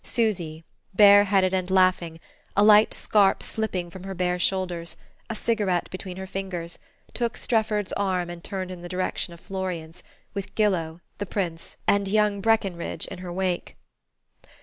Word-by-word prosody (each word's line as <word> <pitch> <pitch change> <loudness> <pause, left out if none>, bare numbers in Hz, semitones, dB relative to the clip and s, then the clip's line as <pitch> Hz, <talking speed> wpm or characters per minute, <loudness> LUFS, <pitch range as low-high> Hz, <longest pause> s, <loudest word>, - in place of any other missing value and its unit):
Susy, 175 -9 -1 0.3
bareheaded 200 -2 +6
and 185 -1 0
laughing, 185 -3 +2 0.4
a 205 - +6
light 210 0 +7
scarf 200 -2 +3
slipping 185 -6 -2
from 185 +1 -10
her 195 0 -6
bare 180 0 0
shoulders, 180 -2 -1 0.3
a 225 - -3
cigarette 205 -6 0
between 185 -1 -7
her 190 - -5
fingers, 185 -3 -5 0.3
took 235 -2 -2
Strefford's 215 -3 0
arm 185 -3 0
and 175 -1 -8
turned 190 -2 -4
in 180 -1 -8
the 175 - -8
direction 185 -1 -2
of 170 - -12
Florian's, 180 -4 -5 0.3
with 200 -1 -6
Gillow, 175 -6 0 0.2
the 205 - -3
Prince 175 -4 -4
and 200 -1 +3
young 210 0 +2
Breckenridge 195 -6 0
in 190 - -8
her 180 -1 -6
wake.... 180 -1 -2
190 Hz, 150 wpm, -25 LUFS, 175-205 Hz, 0.4 s, light